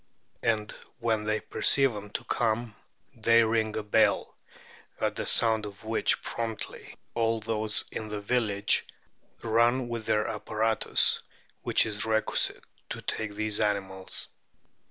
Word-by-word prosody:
And 110 -2 0 0.3
when 110 -2 0
they 110 0 0
perceive, 135 -3 +3
them 105 -1 -7
to - - -4
come 115 -1 -1 0.4
they 115 0 +4
ring 110 -1 0
a 110 - -2
bell, 105 - +2 0.6
at - - 0
the - - -4
sound 110 -2 +4
of 100 +1 -11
which 110 +1 0
promptly 115 -2 -5 0.2
all 115 -1 +1
those 110 -1 0
in 110 - -5
the 105 -1 -4
village 105 -2 +1 0.6
run 120 +2 +2
with 115 -2 -4
their 105 0 +2
apparatus 110 +1 +2 0.4
which - - +3
is 105 -2 -1
requisite 110 -1 0 0.3
to - - -5
take 105 -2 -3
these 110 0 +1
animals. 95 -3 -1
110 Hz, 135 wpm, -28 LUFS, 105-115 Hz, 0.6 s, they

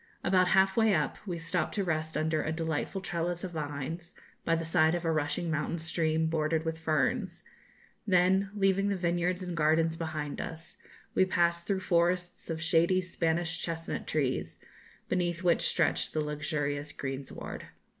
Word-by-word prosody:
About 185 0 +4
half 190 +1 +4
way 220 -3 +4
up 150 -2 -1
we 175 -2 -2
stopped 165 0 -2
to 200 - +1
rest 160 -3 -1
under 155 0 +1
a 155 - -2
delightful 160 +3 -2
trellis 175 -1 -2
of 185 - -4
vines, 155 +2 -5 0.3
by 165 - +2
the 165 0 -2
side 160 0 +3
of 175 0 -3
a 165 - +2
rushing 160 +2 -1
mountain 155 +2 -1
stream, 160 -1 0
bordered 160 0 0
with 160 0 -2
ferns; 170 - 0 0.6
then, 190 +1 +4
leaving 195 0 +2
the 200 - +1
vineyards 175 +1 0
and 180 -1 -4
gardens 160 +1 +2
behind 155 -3 -3
us, 165 0 -8 0.4
we - - +4
passed 170 -2 +1
through 195 -2 0
forests 175 0 0
of 160 -1 -2
shady 170 +3 +3
Spanish 165 -2 -1
chestnut 165 -1 -4
trees, 135 -4 -1 0.5
beneath 175 -1 -1
which 175 -1 +3
stretched - - +1
the 155 - +1
luxurious 145 -1 -2
greensward. 135 -1 -6
165 Hz, 160 wpm, -30 LUFS, 155-180 Hz, 0.6 s, About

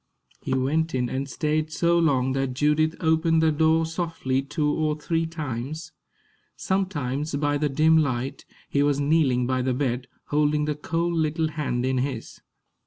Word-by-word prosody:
He - - -1
went 150 +4 0
in 125 -1 0
and 135 +3 -3
stayed 155 0 -1
so 170 +1 +2
long 135 -5 +2
that 135 -1 -1
Judith 150 +3 +2
opened 160 0 +3
the 160 - +4
door 160 +1 +3
softly 160 -5 -2
two 145 +2 -2
or 155 0 0
three 165 +1 -1
times. 150 -1 -5 0.6
Sometimes, 150 -7 -2
by 145 0 0
the 150 0 +1
dim 155 +3 +4
light, 130 -3 -2 0.2
he 140 - +1
was 145 -1 +2
kneeling 140 -4 +2
by 130 0 0
the 125 0 0
bed, 125 -2 -1 0.2
holding 150 0 +2
the 150 - 0
cold 165 +3 -2
little 160 0 0
hand 145 -5 -2
in 130 0 +1
his. 130 -3 -4
150 Hz, 165 wpm, -25 LUFS, 130-160 Hz, 0.6 s, the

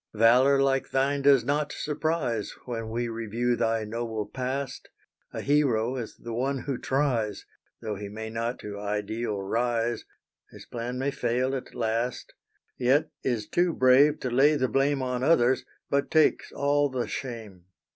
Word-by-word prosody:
Valor 125 +5 +5
like 135 -1 +1
thine 140 +1 +1
does 135 -4 +5
not 145 +1 0
surprise 150 -7 -2
When 115 -3 -4
we 120 +2 -2
review 115 +2 -1
thy 115 -1 0
noble 110 0 -3
past; 130 +4 -4 0.4
A - - -5
hero 130 -5 +2
is 120 -4 -6
the 115 - -7
one 130 +3 -1
who 135 -3 -3
tries, 130 -7 0 0.4
Though 110 -1 -2
he 100 0 -6
may 110 +2 -6
not 115 +2 -2
to 100 -1 -6
ideal 105 +1 -2
rise 120 +2 -1 0.5
His - - -12
plan 120 +1 -5
may 135 +2 0
fail 130 +1 0
at 130 - -7
last 115 +1 -2 0.5
Yet 135 +5 +2
is 115 -5 -1
too 175 +7 +1
brave 130 +3 +5
to 125 - -2
lay 140 +5 +5
the 130 -3 +1
blame 135 +3 +1
On 125 -1 -2
others, 130 -4 +3 0.2
but 140 0 0
takes 155 -1 +3
all 145 +1 +1
the 130 -2 -2
shame. 110 -8 -6
125 Hz, 155 wpm, -27 LUFS, 115-135 Hz, 0.5 s, Valor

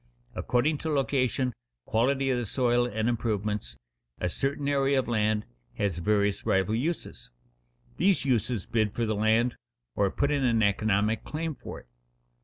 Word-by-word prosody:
According 145 +5 +1
to 160 - -3
location, 130 -3 +1 0.3
quality 135 +4 +1
of 125 - +1
the 120 - -3
soil, 120 +1 +2
and 110 -1 -1
improvements, 105 - -2 0.4
a 90 - -1
certain 140 +5 -2
area 140 -1 +2
of 130 - 0
land 110 -2 +1 0.3
has 95 -5 -1
various 100 +2 +1
rival 95 +3 +1
uses. 155 +9 -3 0.7
These 195 -6 +2
uses 120 -5 0
bid 110 -3 0
for 120 - 0
the 110 - 0
land, 110 +3 +2 0.4
or 100 -1 +2
put 140 +8 0
in 140 -2 +1
an 115 -3 +3
economic 105 +1 +1
claim 160 +1 -3
for - - -9
it. - - -28
120 Hz, 155 wpm, -28 LUFS, 105-135 Hz, 0.7 s, an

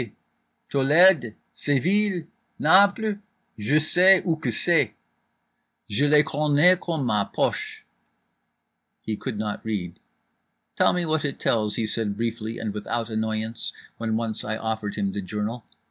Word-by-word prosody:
_ 115 -4 -7 0.6
Tolède? 145 - +4 0.2
Seville? 180 +6 0 0.3
Naples? 200 +2 +4 0.4
Je 115 +8 +1
sais 180 +4 +5
où 160 -3 -1
que - - -1
c'est. 150 -11 +1 1.0
Je 135 +8 +1
les 150 +1 +5
connais 150 +4 +3
comme 165 -6 -3
ma 105 -4 +1
poche." - - -3 1.2
He 110 - -3
could 115 0 -5
not 105 -1 -4
read. 95 -6 -4 0.8
"Tell - - +3
me 180 -1 -1
what 155 -1 0
it 140 -2 -3
tells," 105 -2 0
he 115 - -1
said 105 -2 -3
briefly 115 0 -3
and 110 -2 -4
without 115 +2 -4
annoyance, 110 +1 -3 0.3
when 110 -1 -1
once 115 -1 -1
I 110 +1 -3
offered 110 -2 -4
him 100 -2 -1
the 100 - -4
journal. 105 +4 -5
115 Hz, 140 wpm, -24 LUFS, 110-160 Hz, 1.2 s, sais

